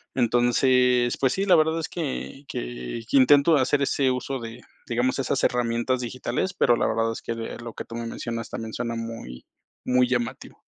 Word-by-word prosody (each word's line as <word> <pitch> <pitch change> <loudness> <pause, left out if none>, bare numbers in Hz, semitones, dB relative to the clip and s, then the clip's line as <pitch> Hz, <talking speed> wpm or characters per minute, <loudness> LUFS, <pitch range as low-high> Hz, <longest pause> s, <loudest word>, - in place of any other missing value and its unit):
Entonces, 125 0 +3
pues 130 -1 +2
sí, 195 - -1
la 185 -3 +6
verdad 160 +1 +2
es 165 - -4
que 145 -3 -5
que - - -5
que - - +3
intento 145 +4 +6
hacer 140 +2 +2
ese 140 -1 +1
uso 130 +1 -2
de, 115 +1 -8 0.3
digamos, 125 +3 0
esas 135 0 -1
herramientas 120 +1 +1
digitales, 125 +7 -3
pero 120 -9 +3
la - - +1
verdad 115 0 0
es, 115 - -6
que, 115 - -4
eh, 115 -1 -6
lo 115 -1 -7
que - - -6
tú 115 - -10
me 115 0 -4
mencionas 115 0 -5
también 110 -1 -6
suena 115 +1 -3
muy 115 - -7 0.4
muy 125 0 +3
llamativo. 120 -2 -3
125 Hz, 190 wpm, -25 LUFS, 115-135 Hz, 0.4 s, la